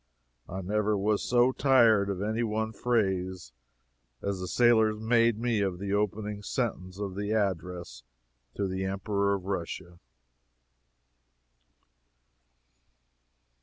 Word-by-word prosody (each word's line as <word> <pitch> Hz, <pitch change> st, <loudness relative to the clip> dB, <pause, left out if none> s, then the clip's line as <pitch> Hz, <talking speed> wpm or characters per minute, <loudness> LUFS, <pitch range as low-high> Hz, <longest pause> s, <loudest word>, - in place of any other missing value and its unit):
I 95 Hz, +2 st, -4 dB
never 105 Hz, +2 st, 0 dB
was 105 Hz, +1 st, +1 dB
so 125 Hz, +1 st, +3 dB
tired 115 Hz, -7 st, +4 dB
of 100 Hz, 0 st, -2 dB
any 110 Hz, +2 st, -1 dB
one 110 Hz, -1 st, -1 dB
phrase 95 Hz, -, -1 dB, 0.7 s
as 100 Hz, -1 st, -3 dB
the 90 Hz, -, -4 dB
sailors 110 Hz, -1 st, +3 dB
made 115 Hz, 0 st, +3 dB
me 115 Hz, -2 st, 0 dB
of 95 Hz, -3 st, -1 dB
the 100 Hz, +1 st, -3 dB
opening 105 Hz, 0 st, -1 dB
sentence 95 Hz, -5 st, -3 dB
of 100 Hz, -2 st, -4 dB
the 100 Hz, +2 st, -2 dB
Address 90 Hz, -, -2 dB, 0.5 s
to 100 Hz, -, -1 dB
the 95 Hz, 0 st, -3 dB
Emperor 100 Hz, +1 st, 0 dB
of 95 Hz, -2 st, -7 dB
Russia. 85 Hz, -2 st, -5 dB
100 Hz, 115 wpm, -29 LUFS, 95-110 Hz, 0.7 s, tired